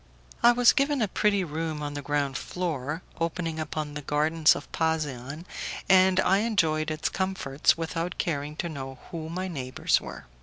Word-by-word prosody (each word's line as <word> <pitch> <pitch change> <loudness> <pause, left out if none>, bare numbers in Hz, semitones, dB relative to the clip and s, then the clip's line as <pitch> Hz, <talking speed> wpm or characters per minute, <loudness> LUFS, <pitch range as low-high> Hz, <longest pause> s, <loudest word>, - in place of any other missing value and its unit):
I 240 - +8
was 245 0 +5
given 280 0 +2
a 220 - +2
pretty 200 0 +2
room 160 -1 -3
on 145 0 -4
the 145 - -4
ground 140 -1 -1
floor, 160 -3 -3 0.2
opening 165 -1 -2
upon 155 -1 -3
the 150 - -5
gardens 155 +2 +3
of 145 - -8
Pasean, 155 -2 -2 0.4
and 190 0 +5
I 195 +2 +3
enjoyed 160 -8 +1
its 155 0 -1
comforts 185 -8 +1
without 165 +1 -3
caring 150 -2 -2
to 170 - -3
know 135 -4 -6
who 160 -3 -5
my 185 +3 -3
neighbours 130 -7 0
were. - - -9
160 Hz, 165 wpm, -27 LUFS, 145-185 Hz, 0.4 s, I